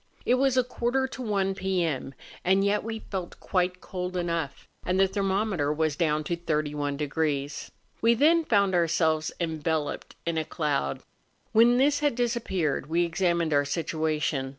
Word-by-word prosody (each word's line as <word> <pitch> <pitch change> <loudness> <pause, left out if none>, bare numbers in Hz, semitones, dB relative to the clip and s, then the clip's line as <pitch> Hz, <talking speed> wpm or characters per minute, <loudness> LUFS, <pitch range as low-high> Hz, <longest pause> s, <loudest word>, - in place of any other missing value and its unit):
It - - +3
was 260 0 +2
a 255 - +5
quarter 250 +2 -1
to 260 - -7
one 200 -4 0
p.m., 175 -8 -1 0.3
and 190 +2 +3
yet 205 +1 +1
we 225 0 -5
felt 185 -3 -5
quite 180 -1 -1
cold 180 0 -4
enough, 170 -5 -3 0.2
and 185 +1 0
the 195 - +5
thermometer 195 -5 0
was 155 -1 0
down 155 -2 +1
to 170 +3 -1
31°. 150 -2 -2 0.3
We 230 +1 +5
then 325 +7 +4
found 200 -8 +2
ourselves 160 -2 +2
enveloped 160 -2 -2
in 165 -1 0
a - - -1
cloud. 150 - -2 0.5
When 235 +2 +5
this 285 +2 +3
had 290 -4 +1
disappeared 225 - -1
we 170 +2 +2
examined 170 -2 0
our 145 0 +4
situation. 155 -2 -1
175 Hz, 150 wpm, -27 LUFS, 155-205 Hz, 0.5 s, a